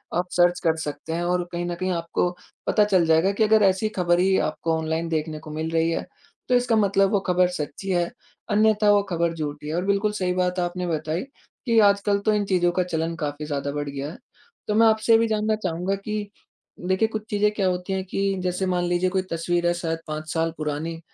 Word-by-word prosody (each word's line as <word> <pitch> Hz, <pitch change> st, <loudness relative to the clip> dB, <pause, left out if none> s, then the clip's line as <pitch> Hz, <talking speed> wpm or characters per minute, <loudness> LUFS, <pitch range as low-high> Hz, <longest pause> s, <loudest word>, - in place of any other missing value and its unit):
आप 175 Hz, +1 st, 0 dB
सर्च 175 Hz, 0 st, +3 dB
कर 165 Hz, -2 st, +3 dB
सकते 160 Hz, +1 st, -5 dB
हैं 170 Hz, +1 st, -1 dB
और 180 Hz, 0 st, +1 dB
कहीं 175 Hz, 0 st, -3 dB
न 175 Hz, 0 st, -3 dB
कहीं 185 Hz, +2 st, -2 dB
आपको 170 Hz, 0 st, 0 dB, 0.4 s
पता 210 Hz, -, +4 dB
चल 190 Hz, -5 st, +3 dB
जाएगा 165 Hz, +4 st, +3 dB
कि 210 Hz, +2 st, +1 dB
अगर 215 Hz, 0 st, +4 dB
ऐसी 195 Hz, +2 st, +2 dB
ख़बर 175 Hz, 0 st, +3 dB
ही 190 Hz, +1 st, +3 dB
आपको 165 Hz, -1 st, -2 dB
ऑनलाइन 160 Hz, +1 st, -2 dB
देखने 155 Hz, -1 st, -2 dB
को 155 Hz, 0 st, -10 dB
मिल 160 Hz, +1 st, -3 dB
रही 165 Hz, 0 st, +2 dB
है -, -, -2 dB, 0.4 s
तो 250 Hz, -, +4 dB
इसका 245 Hz, -2 st, +2 dB
मतलब 195 Hz, -2 st, +3 dB
वो 205 Hz, -, +3 dB
ख़बर 180 Hz, 0 st, +3 dB
सच्ची 150 Hz, +6 st, -5 dB
है 175 Hz, +1 st, +1 dB, 0.4 s
अन्यथा 215 Hz, 0 st, +3 dB
वो 205 Hz, 0 st, +5 dB
ख़बर 170 Hz, -1 st, 0 dB
झूठी 150 Hz, -2 st, -5 dB
है 155 Hz, -, -3 dB
और 180 Hz, +2 st, -1 dB
बिल्कुल 200 Hz, +1 st, +1 dB
सही 185 Hz, -3 st, -1 dB
बात 180 Hz, 0 st, 0 dB
आपने 180 Hz, 0 st, -2 dB
बताई 155 Hz, +1 st, -2 dB, 0.4 s
कि 230 Hz, -2 st, +2 dB
आजकल 200 Hz, 0 st, +2 dB
तो 215 Hz, -, +4 dB
इन 210 Hz, -1 st, +1 dB
चीज़ों 180 Hz, -2 st, +2 dB
का 180 Hz, +1 st, +1 dB
चलन 165 Hz, -1 st, -2 dB
काफ़ी 150 Hz, -2 st, -4 dB
ज़्यादा 140 Hz, -1 st, -3 dB
बढ़ 145 Hz, 0 st, -3 dB
गया 140 Hz, +1 st, -5 dB
है। -, -, -11 dB, 0.5 s
तो 210 Hz, -, 0 dB
मैं 225 Hz, +1 st, +6 dB
आपसे 220 Hz, +1 st, +2 dB
ये -, -, +8 dB
भी 230 Hz, -, +2 dB
जानना 215 Hz, 0 st, +1 dB
चाहूँगा 185 Hz, -1 st, -2 dB
कि 205 Hz, +1 st, -4 dB, 0.6 s
देखिए 190 Hz, +4 st, +3 dB
कुछ 220 Hz, -1 st, -5 dB
चीज़ें 210 Hz, 0 st, +2 dB
क्या 200 Hz, -3 st, 0 dB
होती 180 Hz, +1 st, -2 dB
हैं 190 Hz, -, -1 dB
कि 195 Hz, +1 st, -2 dB, 0.2 s
जैसे 180 Hz, +1 st, -1 dB
मान 180 Hz, -1 st, 0 dB
लीजिए 175 Hz, +1 st, +1 dB
कोई 190 Hz, 0 st, 0 dB
तस्वीर 175 Hz, +1 st, 0 dB
है 175 Hz, -, +3 dB
शायद 165 Hz, -1 st, -3 dB
5 155 Hz, 0 st, -5 dB
साल 165 Hz, 0 st, 0 dB
पुरानी 155 Hz, +2 st, -3 dB
180 Hz, 225 wpm, -24 LUFS, 165-200 Hz, 0.6 s, ये